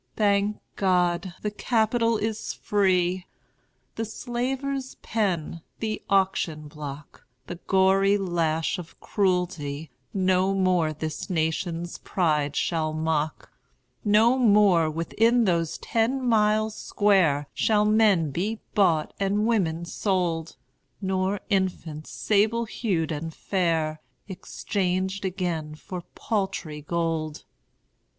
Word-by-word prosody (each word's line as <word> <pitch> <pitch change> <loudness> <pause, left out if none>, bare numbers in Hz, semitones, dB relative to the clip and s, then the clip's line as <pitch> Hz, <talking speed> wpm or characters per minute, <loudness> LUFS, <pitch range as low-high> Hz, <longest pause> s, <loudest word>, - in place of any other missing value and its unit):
Thank 205 0 +2 0.2
God, 180 -1 +1
the 210 - -1
Capital 230 +1 +1
is 220 0 -3
free! 185 -3 +1 0.7
The 225 - -1
slaver's 260 +4 -3
pen, 180 -7 -1 0.2
the 215 -1 -3
auction 190 -6 +1
block, 145 -1 -9 0.2
The 175 - -7
gory 195 +1 +4
lash 170 -3 0
of 170 -2 -11
cruelty, 170 -7 -1 0.2
No 190 0 +2
more 180 -4 +2
this 155 0 -5
nation's 170 0 -2
pride 150 -5 0
shall 160 -2 0
mock; 155 -1 -2 0.5
No 225 +5 +4
more, 200 -8 +5
within 225 +9 +2
those 170 -4 0
ten 250 +4 0
miles 215 -1 +2
square, 180 -9 +2
Shall 210 -1 +2
men 210 -8 +4
be 210 +9 -2
bought 170 -7 +2
and 200 +2 +1
women 170 -8 +1
sold; 170 -3 -1 0.4
Nor 190 0 -1
infants, 175 -5 -1
sable 220 +3 +1
hued 180 -8 -1
and 160 +2 -4
fair, 160 -4 -1 0.3
Exchanged 190 0 -2
again 175 -5 -2
for 180 +3 -7
paltry 190 -8 -2
gold. 160 -1 -2
185 Hz, 105 wpm, -26 LUFS, 165-210 Hz, 0.7 s, more